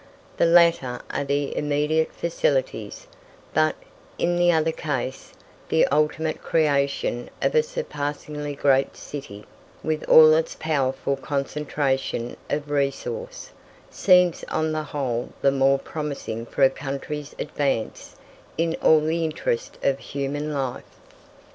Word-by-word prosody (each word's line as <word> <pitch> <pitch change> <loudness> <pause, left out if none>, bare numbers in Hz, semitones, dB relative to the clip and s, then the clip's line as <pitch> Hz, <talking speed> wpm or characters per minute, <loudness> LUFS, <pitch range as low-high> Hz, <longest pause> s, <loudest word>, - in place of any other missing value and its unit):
The - - +4
latter 165 -7 +4
are 145 - -1
the 140 0 -1
immediate 150 +2 +1
facilities; - - -1 0.5
but, - - +3 0.4
in 175 +1 +1
the 175 0 +4
other 160 -1 +2
case, 135 -4 -4 0.4
the 160 - +4
ultimate 155 +2 0
creation 140 -5 0
of - - +1
a 470 - +5
surpassingly 150 - -4
great 135 -1 +2
city, 120 -8 -8 0.4
with 155 -1 -1
all 155 0 +9
its 160 +1 0
powerful 140 -3 0
concentration 135 -3 -2
of 145 0 -2
resource, 465 - -3 0.4
seems 180 -3 +4
on 155 0 -1
the 155 0 -1
whole 130 -5 -3
the 140 - +5
more 135 0 +3
promising 135 -6 -5
for 140 - 0
a 135 - +6
country's 145 +2 -5
advance 135 -6 -2 0.4
in 165 0 +1
all 155 -1 +6
the 160 +2 0
interests 470 - -2
of 135 0 +2
human 145 +2 -3
life. 135 -4 -4
150 Hz, 125 wpm, -24 LUFS, 135-160 Hz, 0.5 s, all